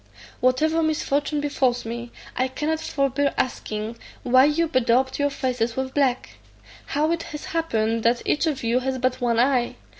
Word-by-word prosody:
Whatever 310 +6 +2
misfortune 295 -1 0
befalls 260 -5 0
me, 235 +1 -5 0.2
I 255 - +1
cannot 300 +4 -2
forbear 275 -1 0
asking, 220 -2 -3 0.2
why 255 +2 +5
you 315 +3 +2
bedaubed 255 -1 +1
your 285 0 +2
faces 250 -4 -1
with 265 0 -3
black? 265 -3 0 0.5
How 305 +3 +1
it 335 -1 0 0.2
has - - -10
happened 230 -9 0
that 235 +2 +2
each 310 +2 +1
of 285 -5 -2
you 235 +2 +2
has 260 0 -2
but 255 0 -1
one 235 -2 +1
eye? 250 -1 +2
260 Hz, 160 wpm, -24 LUFS, 240-290 Hz, 0.5 s, why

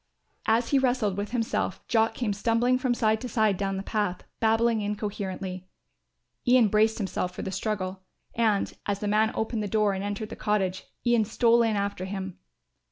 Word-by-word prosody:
As 230 +2 +2
he 280 - +4
wrestled 245 -7 +1
with 205 +1 -3
himself 230 -2 -2
Jock 225 -1 +2
came 225 -5 -1
stumbling 235 +4 +2
from 255 -2 +1
side 220 -1 +1
to 250 - -5
side 215 -3 +2
down 195 0 -2
the 195 - -4
path, 205 -4 -2 0.2
babbling 225 0 +2
incoherently. 195 -3 -4 0.8
Ian 245 -3 +6
braced 220 +2 +3
himself 185 -3 -2
for - - -5
the 190 - -4
struggle 190 -1 -3 0.3
and, 220 -3 +1
as 205 -1 0
the 210 - -3
man 215 +2 +3
opened 220 0 -1
the 210 - -2
door 210 -1 +2
and 190 0 -3
entered 205 +1 -4
the - - -7
cottage, 195 -3 -1 0.2
Ian 240 -2 +4
stole 230 +2 +3
in 225 -2 +2
after 200 -2 -2
him. 190 -1 -5
215 Hz, 180 wpm, -27 LUFS, 200-230 Hz, 0.8 s, Ian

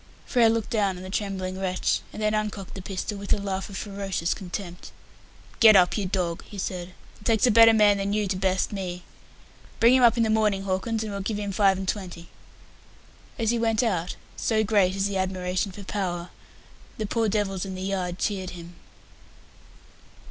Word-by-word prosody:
Frere 235 -3 +4
looked 225 -1 -1
down 200 -4 +1
on 180 - -9
the 185 - -8
trembling 190 -2 -3
wretch, 185 -1 0
and 215 - -6
then 215 0 +2
uncocked 210 -3 -3
the 190 - -7
pistol, 195 +2 -4
with 200 - -7
a - - +1
laugh 195 -1 -3
of 195 - -7
ferocious 195 -4 -2
contempt. 180 -1 -7 0.7
"Get 220 -2 +8
up, 180 -2 +5
you 205 -3 -1
dog," 180 -3 -2
he 205 - -11
said. 180 -1 -5 0.2
"It - - -17
takes 225 -1 +3
a 245 - +4
better 225 +1 +8
man 210 -2 +5
than 195 0 -1
you 210 0 +1
to 190 - -1
best 190 0 0
me. 180 -3 -5 0.8
Bring 235 +2 +6
him 260 - +5
up 240 -1 +5
in 230 - +3
the 220 - +1
morning, 210 -3 +2
Hawkins, 200 +4 -1
and 215 - -5
we'll 200 0 -4
give 205 +2 -2
him 205 -1 -3
five 195 -1 +3
and 190 0 -5
twenty." 180 -4 -4 1.1
As 225 -1 +1
he 235 - 0
went 225 0 +1
out 180 -6 -1 0.2
so 220 -1 +1
great 200 -3 +2
is 195 0 0
the 200 -1 -1
admiration 185 +1 -1
for 200 +2 -10
Power 180 -3 -3 0.7
the 220 - -2
poor 225 +1 0
devils 195 -3 -1
in 190 -1 -5
the 185 - -5
yard 185 -2 -2
cheered 190 -2 -2
him. 175 -1 -10
195 Hz, 200 wpm, -25 LUFS, 185-215 Hz, 1.1 s, Get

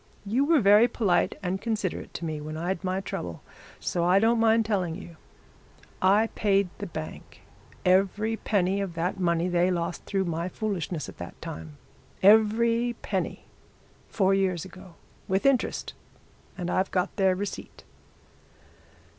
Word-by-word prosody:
'You 240 +8 +1
were 315 -2 +4
very 210 +3 +6
polite 210 -6 +1
and 185 +1 -2
considerate 215 -6 -3
to 170 - -4
me 155 -2 -4
when 155 +1 -6
I'd 175 +3 -2
my 185 +1 -1
trouble, 85 - -6 0.4
so 175 - -1
I 180 +2 +4
don't 225 +3 +3
mind 225 0 +4
telling 185 -6 -1
you. 175 -2 -10 0.9
I 205 +4 +4
paid 200 -2 +2
the 205 - -4
bank 155 -2 -8 0.4
every 195 +4 +2
penny 200 -3 0
of 185 -4 -4
that 175 +3 -2
money 170 -1 +1
they 175 0 +2
lost 170 -2 -2
through 195 -1 -1
my 170 +1 -2
foolishness 180 - -3
at - - -12
that - - -8
time 80 -2 -8 0.5
every 230 +3 +4
penny, - - -3 0.6
four 195 -2 +2
years 190 -3 0
ago, 185 -2 -13 0.3
with 190 +5 0
interest, 275 -2 +1 0.6
and 180 -1 -3
I've 190 +1 +1
got 180 +1 -1
their 190 -2 +3
receipt.' 200 +2 -6
190 Hz, 145 wpm, -27 LUFS, 175-210 Hz, 0.9 s, very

